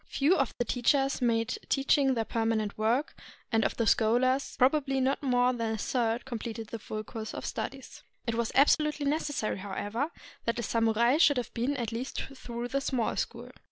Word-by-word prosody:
Few 295 +7 +3
of 270 -7 0
the 240 - 0
teachers 270 +3 +1
made 230 -1 +1
teaching 270 -1 +3
their 225 -1 0
permanent 225 -2 -1
work, 230 +7 0 0.4
and 225 -1 +3
of - - -1
the 230 - +1
scholars, 245 +5 +2
probably 270 +1 +3
not 265 +3 +1
more 250 -2 +3
than 225 -2 -2
a - - -5
third 230 +1 -1
completed 225 -3 -5
the 230 - -5
full 215 +1 -5
course 220 0 -7
of - - -5
studies. 270 0 -5 0.2
It 230 - -1
was 230 0 -1
absolutely 300 +1 +3
necessary, 290 -8 -1
however, 205 +8 -3 0.4
that 230 - 0
a 235 - -2
samurai 230 +4 +2
should 295 -4 +5
have 245 - -3
been 260 +5 -1
at 235 -3 -2
least 240 +4 -4 0.2
through 240 -1 -5
the 275 +2 0
Small 255 -4 -1
School. - - -4
245 Hz, 185 wpm, -29 LUFS, 225-270 Hz, 0.4 s, should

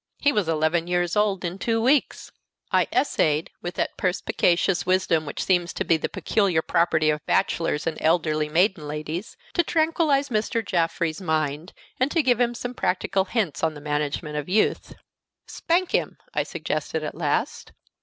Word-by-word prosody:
He 285 - +3
was 210 - 0
eleven 165 +2 +1
years 175 -1 0
old 205 -3 +1
in 175 +3 -4
two 225 +1 0
weeks! 260 +4 +1 0.4
I - - +3
essayed, 155 - +1
with 175 - -5
that - - -2
perspicacious 180 -1 +1
wisdom 180 -4 +1
which 145 - -3
seems 175 -2 +1
to - - -2
be 165 - +4
the 160 - -2
peculiar 190 -7 +1
property 160 -2 +2
of 150 -1 -4
bachelors 165 -2 0
and 160 - -2
elderly 155 -2 +1
maiden 170 -1 +1
ladies, 155 +6 -5 0.2
to 345 - +3
tranquillize 315 -4 +1
Mr. 225 0 -1
Jaffrey's 170 -2 -1
mind, 155 0 -2 0.3
and 255 +2 +2
to 325 0 +1
give 245 -2 +2
him 240 0 +1
some 245 +1 -5
practical 190 -3 0
hints 195 -7 -2
on 160 -1 +1
the - - -8
management 150 +1 -2
of 150 +3 -4
youth. 210 +3 +1 0.5
"Spank 350 +2 0
him," - - 0 0.2
I - - +1
suggested - - -3
at - - -4
last. - - -2
175 Hz, 165 wpm, -24 LUFS, 155-220 Hz, 0.5 s, be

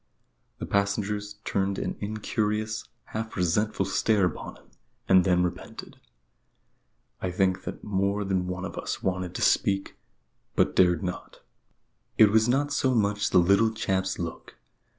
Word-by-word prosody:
The - - -5
passengers 105 +1 -1
turned 95 0 0
an - - -3
incurious, 110 +1 -2 0.3
half 110 +1 -4
resentful 95 +3 +1
stare 100 +1 +2
upon 90 - -4
him, - - -20 0.4
and 95 -1 +6
then 90 -1 +3
repented. 90 0 -6 1.2
I 95 - -1
think 95 0 0
that - - -6
more 100 0 0
than 95 -2 -1
one 90 +1 -4
of - - -6
us - - -4
wanted 95 -1 -2
to - - -2
speak, 95 0 +1 0.6
but - - +2
dared 90 -2 +4
not. 90 -1 -6 0.8
It 105 -2 +7
was 110 +2 +3
not 145 +3 +1
so 130 -1 +1
much 105 -2 +1
the - - +3
little 100 +5 +5
chap's 95 -3 -1
look. 85 -2 -6
100 Hz, 145 wpm, -27 LUFS, 95-105 Hz, 1.2 s, It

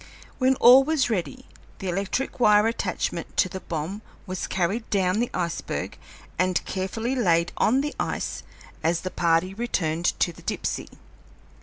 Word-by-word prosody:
When 260 0 +4
all 255 +2 +8
was 285 -4 +1
ready, 225 +6 -3 0.3
the 195 - -6
electric 195 +10 -2
wire 210 -3 +5
attachment 230 +1 -2
to 185 - +4
the 190 +1 -6
bomb 170 +5 -4 0.2
was 185 -2 -4
carried 195 +6 -1
down 190 0 +1
the 240 - 0
iceberg 170 -2 -3 0.4
and 185 0 +1
carefully 220 +6 -2
laid 170 -9 +2
on 260 +5 +3
the 295 +1 -3
ice - - -2 0.4
as 165 +1 +1
the 185 - -4
party 170 +2 +1
returned 175 -7 -1
to 175 - +1
the - - -15
Dipsey. - - -3
195 Hz, 150 wpm, -25 LUFS, 175-240 Hz, 0.4 s, all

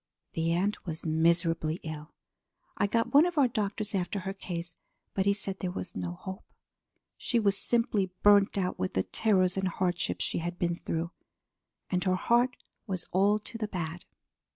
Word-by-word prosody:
The 165 0 0
aunt 195 +5 0
was 160 0 -3
miserably 165 0 +2
ill. 155 -1 -7 0.6
I 205 - +2
got 230 +5 0
one 295 +5 +7
of 350 -2 -4
our 280 -3 +6
doctors 215 -2 -2
after 190 +1 -1
her 190 +1 -4
case, 175 -3 -5 0.4
but 195 0 0
he 200 - +5
said 195 -1 -2
there 185 - -2
was 180 - -5
no 90 -2 -3
hope. 190 - -7 0.7
She 240 - 0
was 200 -3 +3
simply 215 -4 +1
burned 205 -1 +6
out 185 -2 -1
with 95 - -2
the 95 - +2
terrors 190 -4 +2
and 190 0 +1
hardships 180 -1 -1
she - - -1
had 175 +1 -4
been 170 -1 0
through. 165 0 -3 0.8
And 180 -1 +1
her 185 -1 +3
heart 240 +6 +2 0.3
was 185 -3 -2
all 200 +3 +4
to 230 +2 -5
the 215 - -1
bad. 175 -3 -5
185 Hz, 175 wpm, -30 LUFS, 170-205 Hz, 0.8 s, one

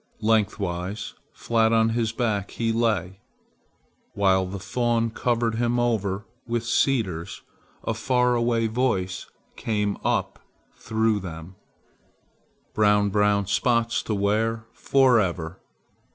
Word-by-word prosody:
Lengthwise, 100 -3 -1 0.2
flat 115 -1 +1
on 115 0 +3
his 115 -1 0
back, 110 -4 -1
he 115 -1 -1
lay. 105 -5 0 1.0
While 95 -2 +2
the 95 +2 -5
fawn 115 +3 0
covered 115 0 0
him 120 +1 0
over 105 -4 0 0.2
with 120 0 -2
cedars, 110 -9 0 0.4
a 115 - -1
far 125 +2 +1
away 115 -1 +1
voice 110 -6 -1 0.3
came 105 -2 -1
up - - -1 0.4
through 110 -1 0
them, 85 -1 -8 1.2
"Brown, 105 -1 +3
brown 105 0 +2
spots 115 +3 +1
to 110 - -2
wear 110 +3 0
forever!" 95 -10 +2
110 Hz, 110 wpm, -25 LUFS, 100-115 Hz, 1.2 s, on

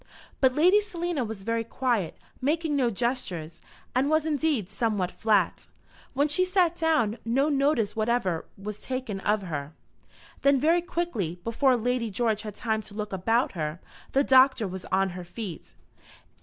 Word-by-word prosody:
But 260 -1 +3
Lady 365 +7 +5
Selina 345 - -2
was 220 -3 -6
very 230 +2 0
quiet, 230 -7 -1 0.2
making 310 +2 0
no 255 -4 +2
gestures, 195 -8 -3 0.3
and 260 +3 +2
was 310 0 +2
indeed 295 - 0
somewhat 205 -4 0
flat. 210 -5 +1 0.5
When 285 +2 +3
she 335 +5 +2
sat 365 -2 +2
down 310 -10 +1
no 270 +6 +2
notice 275 -7 +1
whatever 215 -6 0
was 210 +1 -6
taken 255 -6 -4
of 210 +1 0
her. 150 -4 -5 0.7
Then 280 -1 +4
very 330 +5 +3
quickly, 235 - -3
before 255 +3 +2
Lady 240 0 -1
George 220 0 0
had 210 -2 -7
time 220 -2 -1
to 200 - -13
look 210 -1 -4
about 225 +7 +1
her, 155 -1 -4 0.3
the 275 - +4
Doctor 260 -4 +5
was 185 0 -7
on 190 +1 +1
her 180 0 -7
feet. 175 0 -8
235 Hz, 155 wpm, -27 LUFS, 200-285 Hz, 0.7 s, Lady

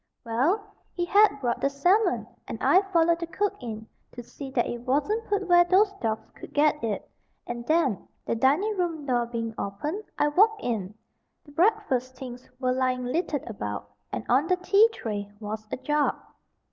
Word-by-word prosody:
Well, 285 - +1 0.3
he 350 - 0
had 400 -3 +4
brought 240 -1 -1
the 275 - +2
salmon, 360 +10 +2 0.2
and - - -5
I 375 - +5
followed 335 -1 +3
the 335 - -4
cook 390 +4 -1
in, 220 -3 -6 0.3
to 245 - -8
see 270 +3 -9
that 255 -3 +1
it 240 - -4
wasn't 300 - 0
put 405 -2 0
where 350 -1 +7
those 390 +3 +3
dogs 220 -1 -2
could - - -13
get 300 -1 +3
it; 220 -3 -2 0.4
and 240 0 -6
then, 310 - +1 0.2
the - - 0
dining 290 - +2
room 330 -5 -2
door 240 -3 +1
being 230 -1 -3
opened, 295 - -3
I 295 - +3
walked 420 +7 +3
in. 215 -4 -2 0.5
The 290 - -15
breakfast 290 - +1
things 250 -1 -9
were 255 -1 +1
lying 255 -1 0
littered 290 +1 -1
about, 105 - -5 0.2
and 115 -2 -4
on 270 +6 +3
the 365 - +3
tea 400 +5 +5
tray 205 - -5
was 215 0 -6
a - - -2
jug. 295 +3 +1
275 Hz, 180 wpm, -26 LUFS, 235-360 Hz, 0.5 s, where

